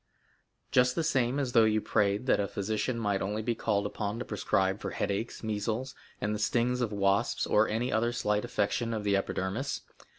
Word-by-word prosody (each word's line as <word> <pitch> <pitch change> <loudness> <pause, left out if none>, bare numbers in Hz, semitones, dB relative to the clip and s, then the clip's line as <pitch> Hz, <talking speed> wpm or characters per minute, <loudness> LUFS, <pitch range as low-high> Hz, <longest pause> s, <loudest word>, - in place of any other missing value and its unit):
"Just 125 0 +4
the 165 - 0
same 135 -4 +1
as 135 -3 -1
though 115 -2 +6
you 110 0 +3
prayed 105 +2 +1
that 130 - +3
a 100 - 0
physician 110 +5 -2
might 105 -4 0
only 105 +3 -2
be 120 +2 0
called 100 -2 0
upon 105 +1 -3
to 125 - -4
prescribe 95 -1 0
for - - -3
headaches, 105 +5 -3
measles, 110 +4 -2 0.3
and 105 +1 -1
the 105 - -3
stings 120 +4 +1
of 115 -3 0
wasps, 100 -1 +1
or 105 +1 +3
any 115 +4 -1
other 115 +2 +1
slight 105 -3 0
affection 115 +2 -1
of 105 - -3
the 100 -1 +2
epidermis. 100 +7 -2
110 Hz, 195 wpm, -30 LUFS, 100-120 Hz, 0.3 s, though